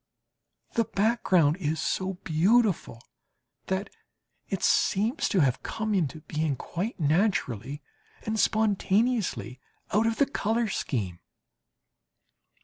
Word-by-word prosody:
The 230 Hz, -, +2 dB
background 190 Hz, -8 st, +2 dB
is 160 Hz, -3 st, -2 dB
so 190 Hz, +3 st, -1 dB
beautiful 180 Hz, -, +2 dB, 0.6 s
that 190 Hz, +1 st, -2 dB, 0.6 s
it -, -, -3 dB
seems 220 Hz, +9 st, +2 dB
to 190 Hz, -, +3 dB
have 130 Hz, -4 st, +1 dB
come 220 Hz, -1 st, -3 dB
into 160 Hz, -5 st, -1 dB
being 155 Hz, -1 st, -1 dB
quite 185 Hz, -, -4 dB
naturally 150 Hz, -, 0 dB, 0.4 s
and 220 Hz, 0 st, -2 dB
spontaneously 210 Hz, -, +1 dB, 0.3 s
out 215 Hz, +3 st, +3 dB
of 225 Hz, -, 0 dB
the 280 Hz, -, +4 dB
colour 230 Hz, -4 st, -1 dB
scheme. 100 Hz, -, -3 dB
190 Hz, 105 wpm, -27 LUFS, 155-220 Hz, 0.6 s, the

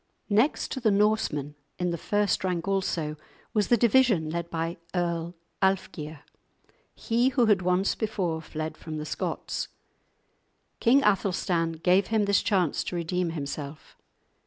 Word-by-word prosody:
Next 225 Hz, +9 st, +2 dB
to -, -, -2 dB
the 230 Hz, -3 st, +2 dB
Norsemen, 200 Hz, -9 st, +1 dB, 0.2 s
in 180 Hz, -1 st, 0 dB
the -, -, -1 dB
first 205 Hz, +1 st, +1 dB
rank 180 Hz, -1 st, -1 dB
also, 170 Hz, -6 st, -1 dB, 0.4 s
was 210 Hz, -3 st, +2 dB
the 240 Hz, -, +4 dB
division 225 Hz, -8 st, +3 dB
led 170 Hz, 0 st, -3 dB
by 165 Hz, +1 st, -3 dB, 0.2 s
Earl 170 Hz, -1 st, -1 dB, 0.3 s
Alfgeir, 160 Hz, -6 st, -1 dB, 0.7 s
he 240 Hz, +3 st, +1 dB
who 255 Hz, -3 st, +3 dB
had 210 Hz, -4 st, +4 dB
once 180 Hz, +2 st, +2 dB
before 190 Hz, -7 st, -2 dB
fled 155 Hz, 0 st, -5 dB
from 155 Hz, -1 st, -6 dB
the 150 Hz, -, -4 dB
Scots. -, -, -3 dB, 1.1 s
King 265 Hz, +4 st, +4 dB
Athelstan 180 Hz, -4 st, +1 dB
gave 180 Hz, +4 st, +2 dB
him 220 Hz, -2 st, +2 dB
this 200 Hz, -1 st, +3 dB
chance 185 Hz, -7 st, +1 dB
to -, -, -4 dB
redeem 175 Hz, +1 st, -1 dB
himself. 145 Hz, -1 st, -6 dB
180 Hz, 140 wpm, -27 LUFS, 165-210 Hz, 1.1 s, the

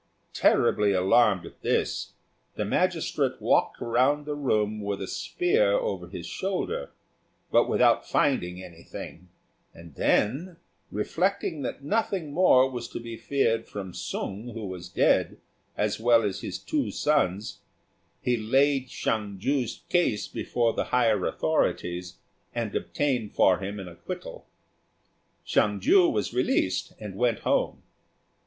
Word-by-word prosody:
Terribly 105 Hz, -1 st, +3 dB
alarmed 95 Hz, +1 st, +3 dB
at -, -, -13 dB
this, -, -, -1 dB, 0.4 s
the -, -, -2 dB
magistrate -, -, 0 dB
walked -, -, +2 dB
round 130 Hz, +5 st, +2 dB
the 150 Hz, -, -3 dB
room 110 Hz, -7 st, 0 dB
with 100 Hz, -1 st, -3 dB
a 95 Hz, -, -3 dB
spear 445 Hz, +8 st, +1 dB
over -, -, -1 dB
his -, -, -7 dB
shoulder, 440 Hz, -, -3 dB, 0.6 s
but -, -, +4 dB
without -, -, +3 dB
finding 95 Hz, -, +1 dB
anything; 85 Hz, +1 st, -10 dB, 0.5 s
and 85 Hz, -2 st, -13 dB
then, 150 Hz, -, +1 dB, 0.3 s
reflecting 160 Hz, -, -1 dB
that 135 Hz, +1 st, -5 dB
nothing 190 Hz, -4 st, -1 dB
more 140 Hz, -6 st, +5 dB
was 120 Hz, -3 st, -5 dB
to -, -, -6 dB
be 115 Hz, -1 st, -7 dB
feared 115 Hz, -4 st, 0 dB
from 95 Hz, -3 st, -7 dB
Sung, 105 Hz, +5 st, -5 dB
who 110 Hz, -2 st, -5 dB
was 90 Hz, -2 st, -7 dB
dead, -, -, +2 dB, 0.4 s
as -, -, 0 dB
well 115 Hz, 0 st, +4 dB
as 100 Hz, -2 st, -2 dB
his -, -, -4 dB
two 300 Hz, -3 st, -2 dB
sons, 110 Hz, -9 st, 0 dB, 0.6 s
he 125 Hz, -, +2 dB
laid 135 Hz, +4 st, +2 dB
Hsiang 105 Hz, -5 st, -2 dB
ju's 130 Hz, +4 st, -1 dB
case 175 Hz, -, +1 dB
before 120 Hz, -2 st, 0 dB
the -, -, -1 dB
higher 115 Hz, -6 st, +2 dB
authorities, 90 Hz, +1 st, -1 dB, 0.4 s
and 115 Hz, -3 st, -3 dB
obtained 125 Hz, -7 st, -1 dB
for 90 Hz, -1 st, +4 dB
him 100 Hz, +1 st, -5 dB
an 95 Hz, -, -7 dB
acquittal. 85 Hz, 0 st, -8 dB, 1.0 s
Hsiang 105 Hz, -1 st, +2 dB
ju 175 Hz, -, +5 dB
was 105 Hz, +2 st, -2 dB
released 125 Hz, -7 st, 0 dB
and 105 Hz, -3 st, -7 dB
went 120 Hz, 0 st, +1 dB
home. -, -, 0 dB
115 Hz, 135 wpm, -27 LUFS, 100-145 Hz, 1.0 s, more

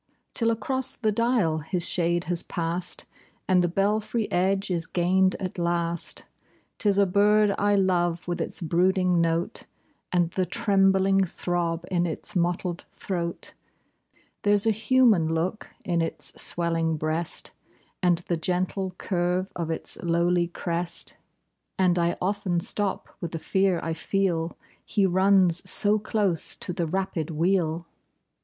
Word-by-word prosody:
Till 230 Hz, -1 st, +2 dB
across 260 Hz, +4 st, -1 dB
the 220 Hz, -3 st, 0 dB
dial 215 Hz, -8 st, +1 dB
his 170 Hz, +3 st, 0 dB
shade 175 Hz, 0 st, +1 dB
has 175 Hz, -1 st, 0 dB
pass'd, 170 Hz, +1 st, -3 dB, 0.4 s
And 185 Hz, -1 st, +4 dB
the -, -, +2 dB
belfry 210 Hz, +5 st, 0 dB
edge 190 Hz, +2 st, +1 dB
is 165 Hz, -2 st, -1 dB
gain'd 185 Hz, +2 st, +2 dB
at 185 Hz, -2 st, -5 dB
last. 170 Hz, -1 st, -1 dB, 0.6 s
'Tis 200 Hz, -2 st, +2 dB
a 200 Hz, -, +5 dB
bird 205 Hz, +2 st, +3 dB
I 205 Hz, 0 st, +3 dB
love, 175 Hz, -3 st, +1 dB
with 175 Hz, -, -2 dB
its -, -, -3 dB
brooding 180 Hz, +1 st, +2 dB
note, 165 Hz, +1 st, 0 dB, 0.5 s
And 175 Hz, -2 st, +1 dB
the 185 Hz, 0 st, -1 dB
trembling 195 Hz, -3 st, +3 dB
throb 170 Hz, -1 st, -2 dB
in 175 Hz, -1 st, +1 dB
its 160 Hz, -, -4 dB
mottled 175 Hz, 0 st, -1 dB
throat; 170 Hz, -3 st, -5 dB, 0.9 s
There's 205 Hz, 0 st, +3 dB
a 225 Hz, -, +4 dB
human 220 Hz, -7 st, +3 dB
look 180 Hz, +6 st, -2 dB, 0.2 s
in 170 Hz, -2 st, +1 dB
its 165 Hz, -, -3 dB
swellinor 165 Hz, -2 st, 0 dB
breast, 155 Hz, +3 st, -2 dB, 0.5 s
And 175 Hz, -2 st, +3 dB
the 170 Hz, -, 0 dB
gentle 185 Hz, +2 st, -2 dB
curve 180 Hz, +1 st, -1 dB
of 170 Hz, -2 st, -3 dB
its 160 Hz, -, -4 dB
lowly 170 Hz, +1 st, +1 dB
crest; 170 Hz, 0 st, -4 dB, 0.6 s
And 180 Hz, -2 st, +3 dB
I 170 Hz, 0 st, +1 dB
often 190 Hz, -2 st, -1 dB
stop 200 Hz, +3 st, -2 dB
with 170 Hz, -2 st, -5 dB
the -, -, -2 dB
fear 190 Hz, +1 st, +1 dB
I 165 Hz, -, -2 dB
feel 170 Hz, -1 st, -1 dB
— -, -, -33 dB
He 200 Hz, -2 st, +1 dB
runs 185 Hz, -2 st, +3 dB
so 210 Hz, +1 st, +5 dB
close 205 Hz, -6 st, +3 dB
to 180 Hz, -, -5 dB
the 170 Hz, -2 st, -2 dB
rapid 185 Hz, -2 st, -2 dB
wheel. 170 Hz, 0 st, 0 dB
180 Hz, 140 wpm, -26 LUFS, 170-195 Hz, 0.9 s, a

